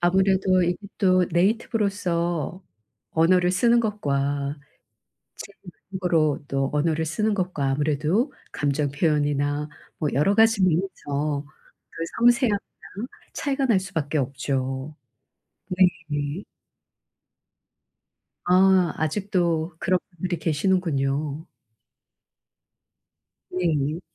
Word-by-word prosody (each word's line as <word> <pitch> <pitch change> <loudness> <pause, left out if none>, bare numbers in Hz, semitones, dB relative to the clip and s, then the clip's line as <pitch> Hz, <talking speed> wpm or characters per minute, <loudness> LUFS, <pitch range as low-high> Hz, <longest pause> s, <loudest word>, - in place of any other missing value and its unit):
아무래도 185 +1 +3
이게 175 0 +1 0.2
또 185 -3 +4
네이티브로서 180 - 0 0.5
언어를 180 +2 +3
쓰는 235 +6 +3
것과 145 -9 -1 0.8
제 200 - -9
2 175 - -9 0.2
외국어로 160 -6 +1
또 135 -1 0
언어를 160 +2 +1
쓰는 215 +8 0
것과 180 -8 -1
아무래도 155 - +1 0.2
감정 145 0 0
표현이나 145 -1 0 0.3
뭐 150 -3 0
여러 175 +10 +2
가지 225 -2 +4
면에서 150 -5 -1 0.4
그 165 - -6
섬세함이랑 240 -2 +4 0.8
차이가 275 -1 -1
날 215 -7 +3
수밖에 160 -6 -3
없죠. 135 +1 -3 0.7
네네. 165 -3 0 2.0
아. 185 0 +4
아직도 170 -1 -1
그런 185 +1 +1 0.2
분들이 175 +1 -2
계시는군요. 155 -3 0 2.0
네. 160 -3 0
170 Hz, 205 characters per minute, -24 LUFS, 145-190 Hz, 2.0 s, 또